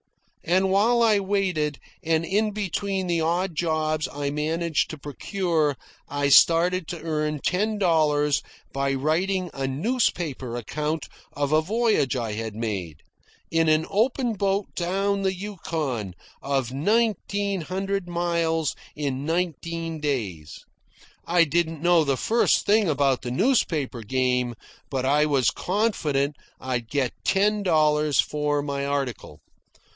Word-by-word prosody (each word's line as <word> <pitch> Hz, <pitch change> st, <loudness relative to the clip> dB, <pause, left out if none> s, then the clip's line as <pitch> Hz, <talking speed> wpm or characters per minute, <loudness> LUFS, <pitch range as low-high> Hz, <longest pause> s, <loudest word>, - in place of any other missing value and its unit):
And 190 Hz, +2 st, +2 dB
while 230 Hz, +5 st, +4 dB
I 215 Hz, -3 st, +4 dB
waited, 185 Hz, -7 st, 0 dB, 0.3 s
and 165 Hz, 0 st, +1 dB
in 210 Hz, +4 st, +1 dB
between 200 Hz, -1 st, -2 dB
the 170 Hz, -2 st, 0 dB
odd 170 Hz, +2 st, 0 dB
jobs 155 Hz, -1 st, 0 dB
I 140 Hz, 0 st, -3 dB
managed 160 Hz, +2 st, 0 dB
to 155 Hz, -, -6 dB
procure, 155 Hz, 0 st, -1 dB, 0.3 s
I 145 Hz, 0 st, 0 dB
started 170 Hz, +4 st, +5 dB
to 170 Hz, -, -5 dB
earn 150 Hz, -2 st, -1 dB
ten 210 Hz, +8 st, 0 dB
dollars 150 Hz, -6 st, +2 dB, 0.3 s
by 140 Hz, 0 st, 0 dB
writing 175 Hz, +6 st, 0 dB
a 135 Hz, 0 st, -2 dB
newspaper 150 Hz, -, -1 dB
account 150 Hz, +6 st, -3 dB, 0.3 s
of 145 Hz, 0 st, -1 dB
a 155 Hz, 0 st, +4 dB
voyage 210 Hz, -, +1 dB
I 115 Hz, -4 st, -2 dB
had 110 Hz, 0 st, -4 dB
made, 95 Hz, -9 st, -4 dB, 0.5 s
in 165 Hz, -1 st, +3 dB
an 155 Hz, +1 st, +3 dB
open 240 Hz, +3 st, +1 dB
boat 200 Hz, 0 st, -1 dB
down 195 Hz, +3 st, 0 dB
the 190 Hz, -1 st, 0 dB
Yukon, 160 Hz, -, -4 dB, 0.3 s
of 135 Hz, -3 st, -1 dB
nineteen 200 Hz, -, 0 dB
hundred 195 Hz, +2 st, -3 dB
miles 170 Hz, -2 st, 0 dB, 0.2 s
in 140 Hz, -2 st, -2 dB
nineteen 165 Hz, 0 st, -2 dB
days. 105 Hz, -, -4 dB, 0.6 s
I 175 Hz, 0 st, +5 dB
didn't 165 Hz, 0 st, -1 dB
know 175 Hz, -2 st, +5 dB
the 140 Hz, -3 st, 0 dB
first 230 Hz, -, +2 dB
thing 210 Hz, -2 st, +3 dB
about 140 Hz, -3 st, +2 dB
the 125 Hz, -, -5 dB
newspaper 150 Hz, -, +1 dB
game, 125 Hz, +1 st, 0 dB, 0.3 s
but 130 Hz, -2 st, -2 dB
I 150 Hz, +3 st, +3 dB
was 135 Hz, -5 st, +2 dB
confident 155 Hz, -9 st, 0 dB, 0.2 s
I'd 125 Hz, -3 st, -3 dB
get 140 Hz, -4 st, 0 dB
ten 205 Hz, +2 st, +2 dB
dollars 155 Hz, -5 st, +2 dB
for 150 Hz, -1 st, +1 dB
my 140 Hz, -1 st, -3 dB
article. 135 Hz, -, -3 dB
160 Hz, 130 wpm, -25 LUFS, 140-190 Hz, 0.6 s, started